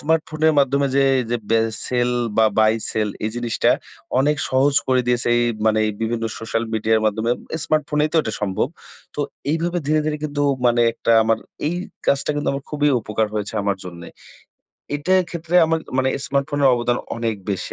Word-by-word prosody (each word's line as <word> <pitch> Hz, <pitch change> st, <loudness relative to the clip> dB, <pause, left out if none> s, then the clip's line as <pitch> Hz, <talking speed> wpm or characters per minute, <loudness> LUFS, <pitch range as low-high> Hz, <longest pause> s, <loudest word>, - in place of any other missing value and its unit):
স্মার্টফোনের 155 Hz, 0 st, +1 dB
মাধ্যমে 140 Hz, 0 st, +2 dB
যে 140 Hz, -, +4 dB, 0.5 s
বে 115 Hz, -, +4 dB, 0.3 s
সেল 125 Hz, -1 st, +1 dB, 0.3 s
বা 110 Hz, -, +6 dB
বাই 110 Hz, 0 st, +5 dB, 0.2 s
সেল 110 Hz, -1 st, 0 dB, 0.2 s
এই 110 Hz, -, 0 dB
জিনিসটা 120 Hz, -2 st, +1 dB, 0.5 s
অনেক 150 Hz, +2 st, +2 dB
সহজ 135 Hz, +2 st, +2 dB
করে 130 Hz, -1 st, +4 dB
দিয়েছে 120 Hz, -1 st, +1 dB
এই 120 Hz, -, +3 dB, 0.2 s
মানে 110 Hz, 0 st, +3 dB, 0.2 s
বিভিন্ন 115 Hz, 0 st, -1 dB
সোশ্যাল 115 Hz, +1 st, -2 dB
মিডিয়ার 110 Hz, 0 st, +1 dB
মাধ্যমে, 110 Hz, +2 st, 0 dB, 0.3 s
স্মার্টফোনেই 150 Hz, -1 st, +1 dB
তো -, -, +1 dB
এটা 110 Hz, -, -4 dB
সম্ভব। 100 Hz, +5 st, 0 dB, 0.5 s
তো 145 Hz, -, -3 dB, 0.3 s
এইভাবে 170 Hz, +3 st, 0 dB
ধীরে, 155 Hz, +1 st, +2 dB
ধীরে 150 Hz, -1 st, 0 dB
কিন্তু 145 Hz, -1 st, -2 dB, 0.2 s
মানে 120 Hz, 0 st, +3 dB
একটা 115 Hz, -, 0 dB
আমার, 110 Hz, 0 st, +1 dB, 0.3 s
এই 170 Hz, -, 0 dB, 0.3 s
কাজটা 140 Hz, +2 st, +2 dB
কিন্তু 145 Hz, -, -2 dB
আমার 140 Hz, 0 st, -5 dB
খুবই 150 Hz, -1 st, +1 dB
উপকার 110 Hz, 0 st, -1 dB
হয়েছে, 105 Hz, -1 st, -3 dB
আমার 100 Hz, -1 st, 0 dB
জন্যে। 85 Hz, -1 st, -9 dB, 0.9 s
এটার 185 Hz, +6 st, +2 dB
ক্ষেত্রে 170 Hz, 0 st, -5 dB
আমার 160 Hz, 0 st, 0 dB, 0.2 s
মানে 130 Hz, -, +2 dB, 0.2 s
স্মার্টফোনের 140 Hz, 0 st, +1 dB
অবদান 120 Hz, 0 st, 0 dB, 0.2 s
অনেক 115 Hz, -1 st, -1 dB, 0.2 s
বেশি, 95 Hz, -, -3 dB
130 Hz, 165 wpm, -21 LUFS, 110-150 Hz, 0.9 s, বা